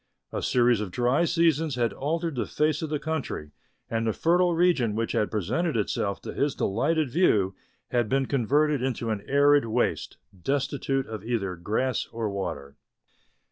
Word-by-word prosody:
A - - -3
series 120 -3 +3
of 105 - -3
dry 125 - +2
seasons 165 -4 +2
had 120 -2 0
altered 165 +3 -2
the 125 - -2
face 150 -1 0
of 160 - -3
the 150 - 0
country, 140 - -4 0.4
and 115 0 -1
the 110 - +1
fertile 175 +1 +2
region 165 -11 +2
which 115 +1 -1
had 105 - 0
presented 115 - -1
itself 100 -1 -1
to - - -6
his 140 -1 0
delighted 145 +7 0
view 105 - +3 0.4
had 120 -3 +1
been 135 0 +2
converted 140 +3 +1
into 120 -3 -2
an 105 -2 -2
arid 145 -1 +4
waste, 115 +2 -1 0.3
destitute 135 -1 -1
of 110 -3 -7
either 110 -6 -2
grass 110 +9 -1
or 115 -2 -3
water. 70 -8 -5
130 Hz, 165 wpm, -26 LUFS, 110-150 Hz, 0.4 s, arid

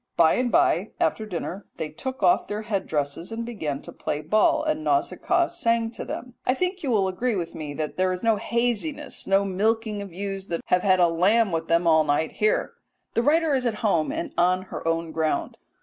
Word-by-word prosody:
By 160 -1 +6
and 245 -1 0
by, 355 +2 +2
after 220 - 0
dinner, 185 +1 -5
they 160 -2 -3
took 260 - -6
off 180 - +4
their 210 +1 -4
head 210 -3 -2
dresses 150 +5 -2
and 230 +1 -4
began 155 -12 -4
to - - -8
play 150 - -3
at 150 +1 -11
ball, 215 +8 +4
and 310 0 -1
Nausicaa 350 +1 +1
sang 230 -10 0
to - - -6
them." 250 0 -6
I 255 - +1
think 365 +4 -2
you 280 - -2
will 205 -5 +2
agree 230 +5 -1
with 170 -3 -3
me 150 -2 -6
that 155 +1 -4
there 185 0 +2
is 180 +3 -4
no 225 -2 +3
haziness 240 +6 -2
no 195 +1 +3
milking 210 +2 0
of 200 -2 -8
ewes 195 +1 -5
that 170 - -3
have 180 - +2
had 185 -1 +3
a 175 - +6
lamb 195 +6 +3
with 165 0 -2
them 170 +1 +2
all 160 -1 +5
night 150 +1 0
here. 215 0 0 0.4
The 230 - +2
writer 310 +3 +3
is 255 -2 +1
at 225 - -1
home 165 -7 +2
and - - -4
on 180 +1 +3
her - - -4
own 165 0 -1
ground. 160 -1 -1
200 Hz, 220 wpm, -25 LUFS, 170-235 Hz, 0.4 s, By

